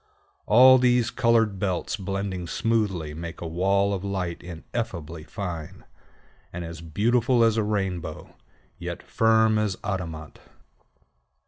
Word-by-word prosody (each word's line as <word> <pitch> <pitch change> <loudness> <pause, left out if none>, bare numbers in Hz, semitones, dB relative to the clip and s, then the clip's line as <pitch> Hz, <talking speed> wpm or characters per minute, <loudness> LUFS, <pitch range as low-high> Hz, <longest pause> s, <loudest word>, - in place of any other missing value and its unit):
All 130 +1 +8
these 125 -2 +3
colored 115 -4 +2
belts 95 0 -1
blending 95 -2 -4
smoothly 95 -8 -1
make 85 +2 -7
a - - -6
wall 100 +4 +1
of 95 -1 -3
light 95 -4 -3
ineffably 85 -2 -6
fine, 85 -3 -6 0.7
and 85 0 -5
as 85 -1 -8
beautiful 115 - +2
as 115 -1 +3
a 110 - +2
rainbow, 95 -5 -3 0.4
yet - - -6
firm 110 -1 +3
as 105 -3 -1
adamant. 85 -7 -5
100 Hz, 120 wpm, -25 LUFS, 85-110 Hz, 0.7 s, All